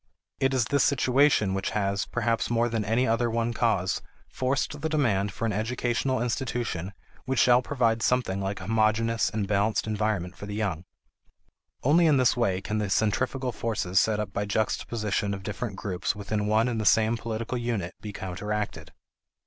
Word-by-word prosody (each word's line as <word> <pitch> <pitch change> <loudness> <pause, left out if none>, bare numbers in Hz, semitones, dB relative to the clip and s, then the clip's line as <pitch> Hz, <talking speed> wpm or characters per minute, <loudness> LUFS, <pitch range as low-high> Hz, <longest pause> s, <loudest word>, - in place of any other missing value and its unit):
It 135 - +2
is 125 -3 +2
this 140 +3 +2
situation 130 -6 +3
which 95 0 -1
has, 100 0 0
perhaps 115 -1 0
more 120 0 +2
than 115 -2 -1
any 115 +5 +1
other 115 +1 +1
one 115 +1 -1
cause, 105 -6 +1 0.3
forced 135 +3 -2
the 160 - -1
demand 110 -10 +1
for 115 - -4
an 110 - 0
educational 120 +3 -1
institution 115 -7 -2 0.3
which 130 0 -1
shall 125 0 +5
provide 120 -4 0
something 110 -4 +1
like 95 0 -3
a - - -6
homogeneous 110 +1 +2
and 105 -2 -2
balanced 105 +2 +1
environment 105 -4 -1
for 100 - -8
the 105 - -5
young. 95 -6 -2 1.0
Only 165 +5 +5
in 150 -3 +4
this 130 -3 +3
way 95 -6 0
can 105 +2 -2
the 105 -2 -1
centrifugal 125 +6 0
forces 105 -5 0
set 110 -1 +1
up 105 - -4
by 100 - -1
juxtaposition 105 -1 -1
of 95 - -9
different 105 +1 -4
groups 95 0 -2
within 105 0 -2
one 110 +3 +3
and 115 -3 -1
the - - -3
same 110 +1 +4
political 115 +2 -3
unit 115 -7 -2
be 105 - -6
counteracted. 105 +3 -4
110 Hz, 175 wpm, -27 LUFS, 100-120 Hz, 1.0 s, shall